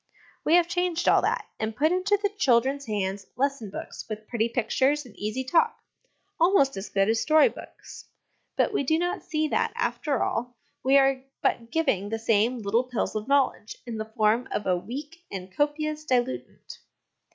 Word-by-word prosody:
We 320 - +4
have 350 -1 +4
changed 355 0 -1
all - - +6
that, - - 0
and 220 0 -2
put 310 +7 +2
into 370 +3 +2
the 410 0 0
children's 270 - +2
hands 195 -2 -2
lesson 275 -5 -1
books - - -7
with 215 0 -6
pretty 235 -1 0
pictures 260 +5 +1
and 225 -5 -15
easy 215 +5 -3
talk, 340 - +2 0.6
almost 330 -6 +4
as 195 +2 -6
good 195 0 +2
as 225 +1 +2
story 310 +9 +5
books; - - -12 0.5
but - - +1
we - - +1
do 315 +4 +2
not 350 +1 -1
see 310 -3 -1
that, - - 0
after 280 -5 -1
all, 245 +1 -2 0.3
we 270 +2 +5
are 270 -1 +3 0.2
but 230 -1 0
giving 230 - 0
the 225 - -2
same 225 +2 +2
little 225 +5 +1
pills 245 -2 -2
of 215 +2 -3
knowledge 275 -6 +1
in 230 -3 -5
the 220 0 -6
form 220 +3 +2
of 210 - -3
a 185 - +2
weak 290 - -7
and 185 -1 -7
copious 305 +1 -1
diluent. 255 -3 -2
260 Hz, 180 wpm, -26 LUFS, 220-305 Hz, 0.6 s, all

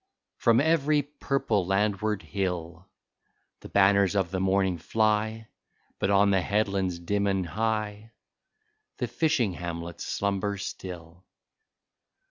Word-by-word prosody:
From 115 -1 +4
every 150 -1 +3
purple 135 -7 -1
landward 100 +2 0
hill 90 -2 -4 0.7
The - - -11
banners 100 0 +4
of 95 -3 +1
the 95 - -1
morning 95 -2 +1
fly. 110 +3 0 0.5
But - - 0
on 100 0 +4
the 95 -1 +3
headlands, 100 -2 0
dim 100 +4 -1
and 95 -2 0
high. 110 +3 -2 0.8
The - - -1
fishing 130 - +1
hamlets 85 0 -6
slumber 100 0 -1
still. 90 -2 -8
100 Hz, 110 wpm, -27 LUFS, 95-110 Hz, 0.8 s, From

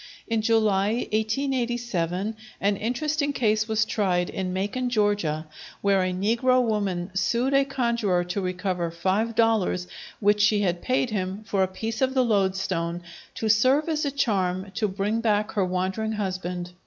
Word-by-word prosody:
In 225 -2 0
July, 215 -2 +2 0.2
1887, 220 -5 -1 0.2
an 200 +1 +2
interesting 285 +6 -1
case 215 -4 +1
was 220 -1 +1
tried 185 -5 0
in 185 -1 -3
Macon, 205 +7 -2
Georgia, 205 -9 0 0.4
where 200 -1 +3
a 185 0 0
negro 230 +7 +2
woman 200 -6 -1
sued 235 +8 +1
a 275 0 +5
conjuror 235 -9 0
to 180 +3 -3
recover 180 -1 -2
five 190 +7 -1
dollars 220 -6 +2 0.3
which 205 0 +3
she 205 0 +4
had 175 -3 0
paid 255 -1 0
him 195 0 -3
for 200 -3 0
a 190 - +3
piece 220 +5 -5
of 265 0 +1
loadstone 190 -7 0 0.3
to 220 - -2
serve 255 +8 +4
as 310 -2 0
a 285 - +1
charm 195 -8 -1
to 215 +2 0
bring 205 +3 -1
back 210 -2 +1
her 205 - +1
wandering 185 +4 -1
husband. 185 -3 -3
210 Hz, 155 wpm, -25 LUFS, 185-230 Hz, 0.4 s, a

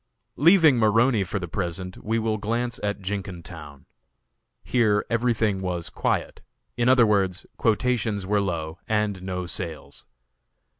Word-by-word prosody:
Leaving 160 -3 +6
Maroney 115 0 +3
for 100 - -4
the 90 -3 -4
present, 90 0 -5
we 110 +2 0
will 110 -1 -1
glance 115 +3 -2
at 105 0 -2
Jenkintown. 90 -7 -7 0.8
Here 110 -4 +2
everything 115 -4 +1
was 90 -2 -3
quiet; - - -2 0.3
in 120 +1 +2
other 125 -2 +6
words, 95 -3 +1
quotations 110 -3 0
were 105 +1 +1
low 85 -4 -3
and 105 -3 0
no 90 -1 -4
sales. 85 -2 -6
105 Hz, 130 wpm, -25 LUFS, 90-115 Hz, 0.8 s, Leaving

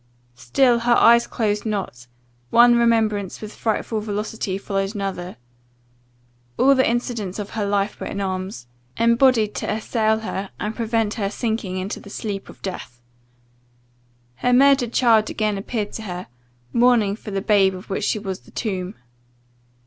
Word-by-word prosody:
"Still 235 - +2
her 240 +1 +3
eyes 235 0 +6
closed 210 -2 -1
not 195 - -4 0.4
one 240 0 +6
remembrance 220 -4 +1
with 215 0 -8
frightful 220 0 -1
velocity 210 -2 -3
followed 195 +1 -3
another 190 -4 -4 1.2
All 275 +2 +5
the 260 -3 +3
incidents 235 -5 -2
of 205 -1 -6
her 210 -3 -2
life 200 0 -1
were - - -5
in 200 - -5
arms, 185 -8 -4 0.3
embodied 235 -2 +3
to - - -3
assail 220 0 0
her, 195 -3 -4
and 215 +1 -3
prevent 225 -2 0
her 200 -3 -2
sinking 215 -4 -3
into 190 +2 -4
the - - -13
sleep 200 -1 -5
of - - -15
death. 150 -10 -6 1.4
Her 250 - +1
murdered 270 -2 +5
child 225 -4 +3
again 215 -1 -1
appeared 205 +1 -4
to - - -5
her, 180 -3 -6 0.5
mourning 235 -4 +3
for 215 - -10
the 195 -1 -2
babe 195 -1 +3
of 185 +2 -10
which 195 - -2
she - - +1
was 195 -3 -5
the - - -20
tomb. 190 -3 -4
210 Hz, 155 wpm, -22 LUFS, 195-230 Hz, 1.4 s, eyes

